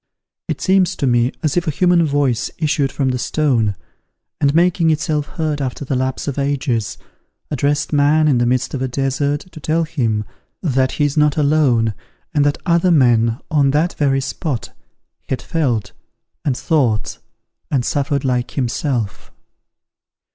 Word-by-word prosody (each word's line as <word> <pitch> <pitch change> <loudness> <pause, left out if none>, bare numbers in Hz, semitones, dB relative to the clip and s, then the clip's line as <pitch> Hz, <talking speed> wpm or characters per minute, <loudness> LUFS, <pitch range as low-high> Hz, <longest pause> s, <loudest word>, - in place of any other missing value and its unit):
It - - -3
seems 190 -2 +2
to - - -2
me 120 0 +2
as 155 - 0
if 175 -2 0
a - - +3
human 175 +2 +3
voice 140 -5 0
issued 145 -4 0
from 135 -2 0
the 125 -1 -1
stone, 120 -8 +1 0.6
and, 140 - +3
making 170 -1 +3
itself 150 -1 0
heard 155 -5 -2
after 135 +1 -4
the 135 - -1
lapse 130 +2 -2
of 140 0 -2
ages, 140 -5 -1 0.5
addressed 145 +2 0
man 150 +2 +4
in 135 -5 +3
the 120 - +2
midst 125 0 0
of 135 - -3
a 130 - 0
desert, 140 +3 -1
to 155 - -10
tell 160 +3 0
him 115 -9 -1 0.4
that 130 -5 +1
he 150 - +1
is 145 +1 -2
not 150 0 +3
alone, 140 -7 +2 0.4
and 145 - +3
that 145 - 0
other 170 +1 +3
men, 120 -7 +3
on 145 -3 +3
that 155 +5 +1
very 135 -2 +1
spot, 135 0 -4 0.5
had 130 - -1
felt, 135 - -1 0.5
and 135 -4 0
thought, 130 -6 0 0.5
and 130 -4 0
suffered 140 -1 -1
like 125 -1 0
himself. 125 - -2
140 Hz, 160 wpm, -18 LUFS, 125-155 Hz, 0.6 s, man